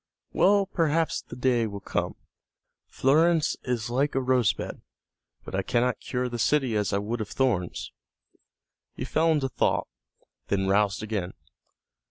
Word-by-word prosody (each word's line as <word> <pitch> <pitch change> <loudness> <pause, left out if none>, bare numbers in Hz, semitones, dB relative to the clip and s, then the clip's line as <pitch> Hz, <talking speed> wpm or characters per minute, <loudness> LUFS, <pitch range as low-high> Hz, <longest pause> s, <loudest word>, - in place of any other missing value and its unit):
Well, 200 0 +4
perhaps 165 -3 0
the - - -11
day 125 -2 +1
will 100 -1 -6
come. - - -2 0.7
Florence 160 +4 +3
is 120 -2 -2
like 135 +4 +1
a - - +3
rose 125 -5 +3
bed, - - -7 0.6
but - - -9
I 95 - +1
cannot 120 +5 0
cure 125 -1 -2
the 120 -1 -5
city 135 -3 +2
as 105 -2 0
I 100 - +1
would 110 +3 -3
of 105 - -5
thorns." 110 -10 -1 1.0
He - - -4
fell 165 +1 +2
into 145 -4 +1
thought, - - 0 0.6
then 95 -1 0
roused 100 +1 +2
again. 105 -4 -3
125 Hz, 150 wpm, -27 LUFS, 105-145 Hz, 1.0 s, Well